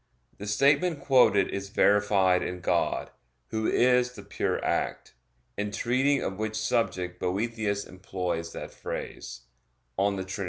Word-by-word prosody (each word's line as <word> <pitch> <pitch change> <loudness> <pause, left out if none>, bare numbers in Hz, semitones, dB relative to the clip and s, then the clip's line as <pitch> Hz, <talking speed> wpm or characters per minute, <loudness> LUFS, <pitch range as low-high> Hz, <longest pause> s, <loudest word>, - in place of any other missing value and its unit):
The 105 - -6
statement 145 - +3
quoted 125 -8 +4
is 100 0 -4
verified 100 -3 +3
in 90 0 -4
God, - - 0 0.4
Who 110 0 -1
is 125 0 +3
the 105 - -10
Pure 100 - -2
Act; - - -2 0.4
in 105 +1 -1
treating 130 +6 +1
of 95 +1 -4
which 110 0 -2
subject 90 -5 -1
Boethius 100 +1 -1
employs 90 -3 -4
that - - -7
phrase - - -6 0.6
(De 100 -1 +1
Trin. 95 +2 -6
105 Hz, 130 wpm, -28 LUFS, 95-120 Hz, 0.6 s, quoted